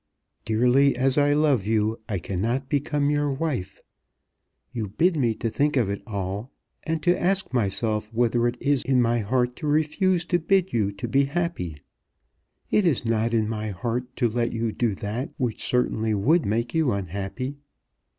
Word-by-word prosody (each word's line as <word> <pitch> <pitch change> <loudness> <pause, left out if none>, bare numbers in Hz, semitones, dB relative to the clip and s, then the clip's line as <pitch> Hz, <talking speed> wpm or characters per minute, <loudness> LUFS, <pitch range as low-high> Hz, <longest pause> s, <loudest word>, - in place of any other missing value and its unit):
Dearly 125 +5 +3
as 130 +1 +2
I 145 0 +4
love 145 -9 +2
you 110 0 +1
I 100 - -1
cannot 115 +10 -2
become 145 0 0
your 145 -1 +1
wife. 135 - -3 0.9
You 115 -4 -3
bid 165 - +1
me 120 -7 +1
to 115 - -3
think 145 +5 +1
of 110 -6 +2
it 100 - -4
all, 100 +2 -4 0.3
and 160 -1 -3
to 175 0 +2
ask 190 -6 0
myself 105 -1 0
whether 120 +1 +2
it 120 0 -2
is 140 -2 +1
in 130 -2 +2
my 120 0 +2
heart 125 +3 0
to 155 - -4
refuse 160 +4 +1
to 175 0 +1
bid 190 +2 +1
you 105 -3 +1
to 100 - -5
be 140 +1 +3
happy. 145 - -3 0.9
It 210 - +4
is 160 -10 +1
not 115 0 +1
in 110 -2 +1
my 110 -1 -3
heart 120 +6 -3
to 120 - +2
let 115 +1 -1
you 115 -1 -1
do 115 -2 0
that 110 +7 -4
which 120 -4 -2
certainly 110 -3 +1
would 150 - +2
make 115 +3 -1
you 160 -5 +2
unhappy. 100 - -4
120 Hz, 175 wpm, -25 LUFS, 110-145 Hz, 0.9 s, I